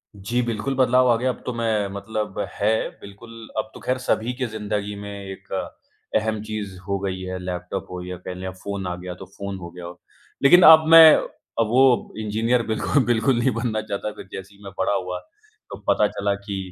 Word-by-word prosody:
जी, 115 +5 -1
बिल्कुल, 115 +4 -2
बदलाव 125 0 +4
आ 115 - +4
गया। 130 +2 0
अब 125 - -4
तो 125 - -2
मैं 110 -3 0
मतलब 105 0 -4
है, 110 +2 +1
बिल्कुल, 100 +4 -12 0.3
अब 110 0 -2
तो - - -11
खैर 130 - +1
सभी 120 0 0
के 125 0 -3
ज़िंदगी 105 -2 -3
में 100 0 -7
एक 95 0 -10 0.6
अहम 110 -1 0
चीज़ 105 -3 -5
हो 100 - 0
गई 95 -1 -3
है, 95 0 -4
लैपटॉप 90 +1 -5
हो 90 0 -5
या 90 0 -6
कह 90 - -4
लें 90 +1 -6
अब 95 - -5
फ़ोन 100 -2 -4
आ 90 - -3
गया 90 0 -7
तो - - -7
फ़ोन 100 -1 -5
हो 85 - -8
गया 90 -1 -9
हो। 85 0 -10 0.4
लेकिन 175 +6 +8
अब 160 0 +9
मैं 165 -1 +10 0.5
अब 115 - +3
वो 125 +1 +3
इंजीनियर 115 +3 +1
बिल्कुल 120 +5 +1
बिल्कुल 120 +2 +2
नहीं 130 +2 +2
बनना 115 -1 -1
चाहता। 105 0 -4
फिर - - -10
जैसे 95 +1 -9
ही 100 - -19
मैं 100 - -8
बड़ा - - +1
हुआ, 90 -1 -2 0.5
तो - - -7
पता - - +4
चला 100 0 -1
कि 100 -1 -4
105 Hz, 210 wpm, -23 LUFS, 95-120 Hz, 0.6 s, मैं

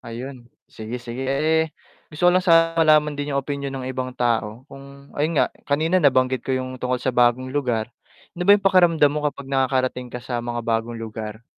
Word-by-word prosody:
Ayun, 120 +1 -9 0.2
sige 110 +3 -7
sige, 120 +2 -6
eh 155 +4 +2 0.5
gusto 160 +4 0
ko - - +7
lang 185 - +3
sana 165 0 +5
malaman 155 -2 +4
din 145 0 -4
yung 140 - +1
opinyon 140 0 -4
ng 130 -1 -5
ibang 130 0 -4
tao 115 0 -1
kung 140 0 -14
ayun 155 +2 -1
nga - - +4 0.2
kanina 160 +6 +2
nabanggit 130 -2 +3
ko - - -5
yung 130 0 -4
tungkol 125 0 0
sa 130 - 0
bagong 125 +2 +2
lugar, 120 -6 -1 0.5
ano 180 - -4
ba - - +9
yung 195 - -10
pakiramdam 170 -6 +4
mo 150 - -2
kapag 140 -1 -10
nakakarating 130 -2 0
ka 125 - -6
sa 125 -1 -4
mga 120 0 -4
bagong 115 0 -1
lugar? 110 0 -7
130 Hz, 195 wpm, -22 LUFS, 120-150 Hz, 0.5 s, ba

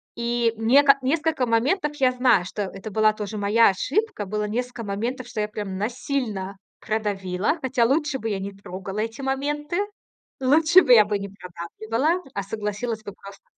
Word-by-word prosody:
И 235 -1 0
нека 275 +5 +5
несколько 305 0 +1
моментов 290 +7 +1
я 260 -3 +3
знаю, 250 -6 +3
что 205 +3 -4
это 195 +2 -7
была 215 +1 +3
тоже 215 0 -5
моя 210 +3 +4
ошибка. 270 - -1
Было 210 +2 -2
несколько 245 +2 -3
моментов, 235 +5 -3
что 240 -3 -6
я 210 - -1
прям 205 -3 -5
насильно 220 -4 -3 0.2
продавила. 205 - -1
Хотя 255 -3 +1
лучше 290 +1 +1
бы 225 - -3
я 200 -2 -2
не 195 +1 -5
трогала 195 +1 -7
эти 225 +4 -3
моменты. 290 +4 -2 0.6
Лучше 310 +7 +5
бы 255 -6 +5
я 215 -3 +8
бы 205 -1 -1
не 200 0 -6
продавливала, 220 - -3
а 200 - -3
согласилась 215 +2 -4
бы 205 - -8
просто 200 0 -13
225 Hz, 170 wpm, -24 LUFS, 205-265 Hz, 0.6 s, я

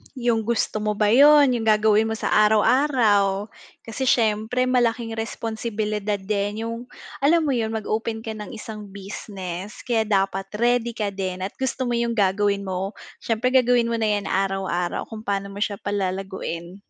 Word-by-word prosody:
'Yung 235 -3 0
gusto 235 -2 0
mo 210 0 -1
ba 210 0 +2
'yun, 285 +2 +7
'yung 225 - -4
gagawin 215 0 +4
mo 220 - -1
sa - - -2 0.2
araw-araw, 215 -4 +3 0.3
kasi 245 +4 -4
siyempre 220 +1 +2
malaking 240 -2 +1
responsibilidad 215 -3 -3
din, 205 +2 -2
'yung 230 +2 -5 0.3
alam 320 +4 +3
mo 295 - 0
'yun, 225 -4 -1
mag-open 220 +1 -2
ka 225 - -5
ng 215 +2 -7
isang 215 -1 -8
business 195 0 -7
kaya 225 -3 0
dapat 195 -1 0
ready 240 +1 +1
ka 210 -3 -2
din 185 -1 -4
at 190 - -2
gusto 265 0 -2
mo 240 -1 0
'yung 235 0 0
gagawin 200 -1 +1
mo, 190 +1 -3 0.2
siyempre 230 +2 0
gagawin 245 -2 +3
mo 230 - 0
na 220 - +1
'yan 205 -1 -1
araw-araw, 190 -2 -1
kung 220 -1 -9
paano 200 0 -2
mo 200 - -8
siya 205 -1 -2
palalaguin. 190 -3 -4
215 Hz, 165 wpm, -23 LUFS, 200-235 Hz, 0.3 s, yun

